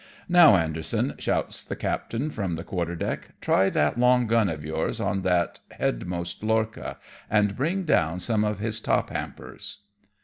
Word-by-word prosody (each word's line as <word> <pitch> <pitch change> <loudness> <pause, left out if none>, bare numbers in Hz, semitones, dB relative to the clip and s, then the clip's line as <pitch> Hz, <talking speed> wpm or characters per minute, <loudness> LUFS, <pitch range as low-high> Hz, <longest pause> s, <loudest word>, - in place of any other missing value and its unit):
"Now, 175 - +8
Anderson," 80 -2 0
shouts - - -1
the - - -5
captain 135 +7 -2
from 95 -9 -2
the 80 - -6
quarter 85 -2 -3
deck, - - -4
"try 95 +1 +3
that 120 - +1
long 125 0 +4
gun 115 -3 +3
of 75 -2 -5
yours 80 +1 -2
on 95 -2 0
that 90 -2 +1 0.2
headmost 85 +6 -2
lorcha, 110 0 -1 0.3
and 105 -1 +2
bring 170 +8 0
down 85 - +2
some 110 +2 +1
of 105 0 0
his 110 +1 -1
top - - 0
hampers." - - -6
105 Hz, 160 wpm, -26 LUFS, 85-115 Hz, 0.3 s, Now